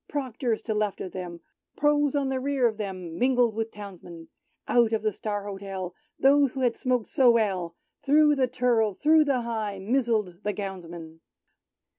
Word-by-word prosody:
Proctors 255 -5 -2
to 220 - -2
left 210 -2 -1
of 185 - -6
them, 175 -2 -7 0.4
Pro's 295 -1 +2
on 280 -2 0
the 265 -1 -1
rear 275 -1 0
of 220 -2 -3
them. 185 -5 -6
Mingled 245 -2 +3
with 225 +1 -3
Townsmen! 175 -6 -11 0.4
Out 235 -2 +3
of 220 -1 0
the 215 - +1
"Star 205 0 -4
Hotel," 195 -2 -6 0.2
Those 275 -1 +4
who 265 - -4
had 245 -2 +2
smoked 250 -4 0
so 260 -2 +3
well. 190 -7 +1 0.3
Thro' 300 +1 +4
the 265 -3 +1
Turl— 235 -4 +1
through 310 - +4
the 270 -4 +1
High 220 -4 -3
Mizzled 215 -4 -1
the 210 0 -2
Gownsmen 170 -5 -7
220 Hz, 170 wpm, -26 LUFS, 195-260 Hz, 0.4 s, Those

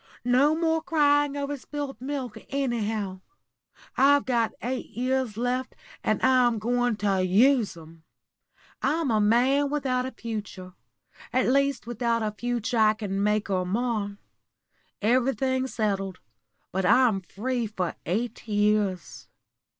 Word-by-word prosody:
No 265 +5 +4
more 320 0 +1
crying 290 -2 +2
over 285 0 -2
spilt 280 -2 -6
milk, 260 -4 -4
anyhow. 220 -8 -2 0.7
I've 285 +1 +4
got 235 -3 +1
eight 255 +2 -3
years 255 -2 -1
left, 250 +2 -2 0.3
and - - +1
I'm 250 -3 +4
going 245 +2 0
to 200 -2 0
use 215 +2 +3
'em. 165 0 -14 0.8
I'm 310 -2 0
a 215 -1 +2
man 255 +7 +3
without 260 -3 -1
a - - -6
future 210 -6 -7 0.6
at 255 - +2
least 275 0 +1
without 235 -1 -1
a 215 - -1
future 240 +2 -2
I 215 0 +5
can 200 -3 -3
make 210 0 0
or 185 -1 +1
mar. 205 0 -2 0.9
Everything's 260 +2 +1
settled, 195 -4 -1 0.5
but 190 +1 -1
I'm 215 0 +4
free 235 +5 -3
for 185 -5 -3
eight 225 +6 -3
years. 205 -3 0
240 Hz, 125 wpm, -26 LUFS, 210-260 Hz, 0.9 s, I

